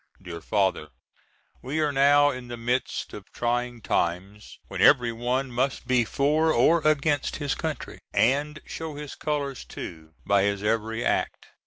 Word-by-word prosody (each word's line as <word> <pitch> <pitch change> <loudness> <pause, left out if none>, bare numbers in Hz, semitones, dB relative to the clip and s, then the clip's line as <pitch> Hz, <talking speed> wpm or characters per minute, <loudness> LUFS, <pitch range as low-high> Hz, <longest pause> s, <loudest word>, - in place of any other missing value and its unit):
DEAR 85 -3 -8
FATHER: 95 -7 0 0.7
We 140 +5 -3
are 150 -2 +2
now 145 +1 +5
in 125 -2 -7
the 120 0 -6
midst 120 +2 -2
of 105 -1 -10
trying 120 0 -2
times 95 +5 -2
when - - -5
every 120 -1 +5
one 125 +3 -2
must 130 +2 -1
be 125 -2 +2
for 150 +6 +2
or 160 +6 +4
against 150 -1 +1
his 145 -2 -2
country, 160 -2 -5
and 145 +5 +1
show 160 -2 -6
his 150 -1 -7
colors 145 -3 -3
too, 80 -2 -9
by 100 -1 +3
his 100 0 0
every 110 +2 -1
act. - - -1
125 Hz, 155 wpm, -26 LUFS, 110-145 Hz, 0.7 s, now